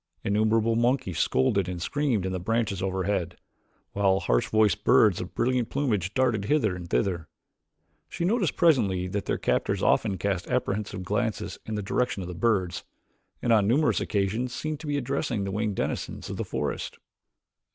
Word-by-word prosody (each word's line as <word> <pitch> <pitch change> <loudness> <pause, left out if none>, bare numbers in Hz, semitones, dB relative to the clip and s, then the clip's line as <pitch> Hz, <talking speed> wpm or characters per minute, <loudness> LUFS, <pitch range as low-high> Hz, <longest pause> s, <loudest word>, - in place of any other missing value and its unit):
Innumerable 110 +2 +2
monkeys 120 - +1
scolded 95 +8 +2
and 90 -1 -4
screamed 120 0 0
in 95 - -2
the 95 - -2
branches 110 0 -1
overhead, 95 -2 -1 0.5
while 95 -1 +2
harsh - - +1
voiced 110 -1 +2
birds 105 -4 +5
of 90 - -8
brilliant 125 -1 +1
plumage 110 - -1
darted 120 -6 +1
hither 110 -7 +2
and 85 -1 -8
thither. 85 -5 0 0.8
She 170 - -3
noticed 200 -3 +1
presently 105 - +3
that 100 +1 -3
their - - 0
captors - - 0
often 100 -4 +2
cast 95 -2 -2
apprehensive 100 -5 -2
glances 105 +3 -2
in 110 - -3
the 105 - -3
direction 105 -1 -1
of - - -6
the 90 - -5
birds 95 -2 0 0.6
and 120 - +3
on 105 -3 +4
numerous 145 +7 +2
occasions 110 +5 -1
seemed 155 +1 -3
to 155 - -8
be 145 0 0
addressing 135 -4 -1
the 100 - -3
winged 105 0 -1
denizens - - -3
of - - -5
the - - -2
forest. - - -3
105 Hz, 170 wpm, -27 LUFS, 95-120 Hz, 0.8 s, birds